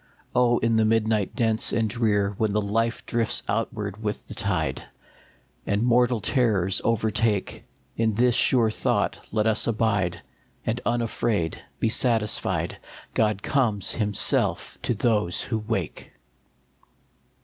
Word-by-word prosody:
Oh, 120 -1 +3
in 115 0 +1
the 110 - +4
midnight 110 -2 +1
dense 110 -2 +1
and 115 -1 +1
drear, 105 -3 +1
When 110 -2 +1
life 110 +3 0
drifts 115 -2 0
outward 105 -2 -3
with 105 -1 -4
the - - -8
tide, - - -2 0.8
And 100 +2 +1
mortal 120 0 +3
terrors 105 -7 +1
overtake, 110 -2 0 0.3
In 110 -2 0
this 120 +2 +3
sure 115 -2 +3
thought - - 0
let 105 0 +1
us 110 -1 +1
abide, 100 -6 0 0.4
And 115 +2 -1
unafraid 115 -7 -1 0.2
be 115 - +1
satisfied, 115 -2 0 0.3
God 105 -2 +1
comes 110 -8 +1
himself 105 -3 +1
to 120 - -1
those 105 -5 +1
who 110 - -2
wake 105 -6 -4
110 Hz, 125 wpm, -25 LUFS, 105-115 Hz, 0.8 s, the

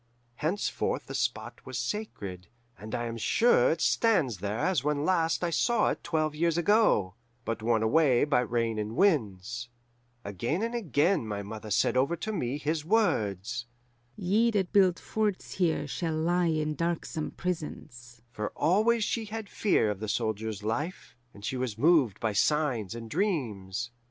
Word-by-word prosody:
Henceforth 175 +7 -1
the - - -8
spot - - -3
was - - -6
sacred, 100 - -4 0.3
and 110 +1 -6
I 120 - -2
am 115 0 -4
sure 225 - +4
it 160 0 -1
stands 160 - +2
there 100 +3 -3
as 170 0 +1
when 150 0 0
last 165 -2 +1
I 170 - 0
saw 235 +8 +2
it - - -6
twelve 155 -2 0
years 165 +1 +1
ago, 175 - +3 0.3
but 115 -1 -3
worn 110 0 +2
away 135 +1 +4
by 145 -3 +3
rains 115 -2 -1
and 105 +2 -4
winds. 120 - +1 0.6
"Again 120 - -2
and 230 +1 -2
again 170 - +1
my 100 -1 -3
mother 110 +1 -7
said 105 - +2
over 135 +6 +2
to 220 +5 -4
me 135 - -2
his 150 +1 -2
words, 120 - 0 0.5
'Ye 210 - +2
that 200 -5 -1
build 190 -4 +5
forts 210 -3 -2
here 165 -5 +1
shall 160 +3 -2
lie 175 +2 +1
in 155 -1 0
darksome 165 -1 -2
prisons'; 125 -9 -6
for 105 -2 -3
always 220 +6 +3
she 225 +1 -1
had 215 0 -6
fear 150 - +2
of 100 - -5
the 110 0 -4
soldier's 110 -2 -2
life, 145 - -3 0.2
and 100 0 -11
she 130 - -2
was 125 -4 -3
moved 145 - +3
by 110 -2 -1
signs 120 -4 +1
and 115 -1 -7
dreams. 120 - -2
145 Hz, 165 wpm, -29 LUFS, 110-180 Hz, 0.6 s, build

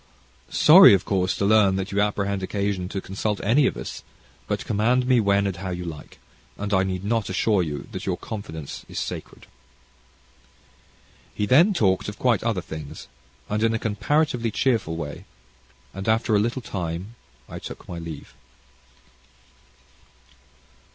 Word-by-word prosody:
"Sorry, - - +8
of 95 - -3
course, 95 -2 0
to 100 - -1
learn 100 -2 +4
that 95 +1 -3
you 100 +1 +1
apprehend 100 -1 -1
occasion 100 -1 -2
to 95 - -4
consult 100 +2 -3
any 130 +7 +4
of - - -3
us; - - -6 0.5
but, - - -2
command 120 +4 +1
me 125 -1 +4
when 100 -1 +2
and 95 -3 -2
how 95 +1 -5
you 90 -1 -4
like, 80 -3 -9 0.4
and 100 0 -3
I 95 - +4
need 95 -1 -2
not 110 0 -1
assure 95 +1 +2
you 75 -4 -4
that - - -6
your - - 0
confidence 80 -9 -7
is - - -8
sacred." - - -6 1.9
He 105 - 0
then 160 - +5
talked 100 - +1
of 105 - -9
quite 120 -5 +2
other 110 -5 0
things, 80 -5 -9 0.4
and 105 +1 -2
in 115 0 +2
a - - +1
comparatively 120 +3 0
cheerful 110 -8 0
way 75 -3 -6 0.7
and 95 +3 -4
after 110 0 +2
a - - +4
little 120 +4 -1
time, 90 +1 -5 0.3
I - - -8
took - - -9
my 85 - -6
leave. 80 -6 -8
100 Hz, 160 wpm, -24 LUFS, 95-110 Hz, 1.9 s, Sorry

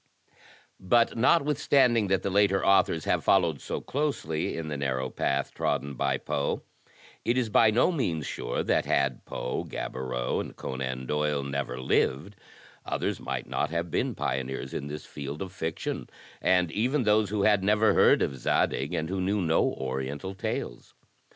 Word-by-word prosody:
But 115 +5 +3
notwithstanding 135 -4 +3
that 95 -1 +1
the 100 - -1
later 100 0 +3
authors 95 -4 +3
have - - +1
followed 85 -7 +3
so - - -4
closely 125 - -2
in 80 -1 -4
the 75 - -3
narrow 65 -2 -2
path 70 0 -1
trodden 70 0 -1
by 70 0 0
Poe, 70 +1 -2 0.6
it 120 +2 +1
is 120 -3 +1
by 110 +1 +5
no 120 +11 +3
means 85 - -1
sure - - -3
that - - +1
had 70 -2 +1
Poe, 65 - -3
Gaboriau 65 -1 -3
and - - -6
Conan 65 -1 -4
Doyle 75 0 0
never 70 -2 -3
lived, 70 +8 0 0.5
others - - -2
might - - -4
not - - -1
have 85 +1 -3
been - - 0
pioneers 65 0 -3
in 70 - -4
this 75 +1 -7
field 70 +1 -6
of 95 -1 -6
fiction, 80 -3 -4 0.3
and 90 -3 +3
even 125 - +1
those 105 -1 +3
who 105 -1 0
had 105 -2 +4
never 105 +2 +4
heard - - +5
of 70 - -2
Zadig 70 +6 0
and 80 -1 -1
who 95 +2 -2
knew 100 +3 +1
no 80 -3 +2
Oriental 65 +7 -4
tales. 95 -9 -5
80 Hz, 165 wpm, -28 LUFS, 70-105 Hz, 0.6 s, by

